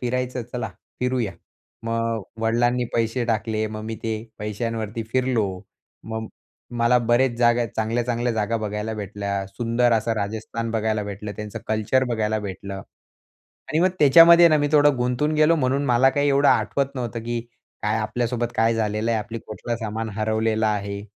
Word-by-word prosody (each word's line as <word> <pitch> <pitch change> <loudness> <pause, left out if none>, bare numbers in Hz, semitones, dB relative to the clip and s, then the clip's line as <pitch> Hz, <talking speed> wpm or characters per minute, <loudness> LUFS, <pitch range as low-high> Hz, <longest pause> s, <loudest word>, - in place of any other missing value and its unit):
फिरायचं, 125 0 -2
चला 125 - -3 0.3
फिरूया. 125 -5 0 0.5
मग 115 -1 -1 0.2
वडिलांनी 120 +2 +2
पैसे 115 +1 0
टाकले, 110 -1 0
मग 110 0 -6
मी 110 0 -4
ते 110 -1 -1 0.2
पैशांवरती 110 +1 -3
फिरलो. 125 -5 +1 0.6
मग 110 +1 -4 0.5
मला 120 +1 +4
बरेच 120 +2 +2
जागा, 120 0 +3
चांगल्या-चांगल्या 120 +2 0
जागा 110 +1 0
बघायला 105 0 -3
भेटल्या. 100 -1 -3
सुंदर 115 +4 +1
असं 115 0 +1
राजस्थान 110 +2 -3
बघायला 110 -1 0
भेटलं. 100 +1 -6
त्यांचं 105 -1 -6
कल्चर 110 +4 +1
बघायला 110 -3 -1
भेटलं 100 -1 -6 0.9
आणि 155 - 0
मग 185 - +5
त्याच्यामध्ये 170 +4 +8
मी 145 0 +1
थोडं 145 -2 +5
गुंतून 125 +5 0
गेलो 155 +2 +4
म्हणून 135 0 +1
मला 125 +1 +4
काही 145 +2 +1
एवढं 140 0 +4
आठवत 140 -1 +2
नव्हतं, 120 -3 -4
की 120 0 -2 0.4
काय 105 +1 +1
आपल्यासोबत 120 +2 -1
काय 115 +1 +3
झालेलं 110 0 -1
आहे, 115 - +1
आपलं 115 +2 -5
कुठलं 110 +3 -4
सामान 110 0 -4
हरवलेलं 110 0 +1
आहे. 100 -1 -2
115 Hz, 150 wpm, -23 LUFS, 110-125 Hz, 0.9 s, त्याच्यामध्ये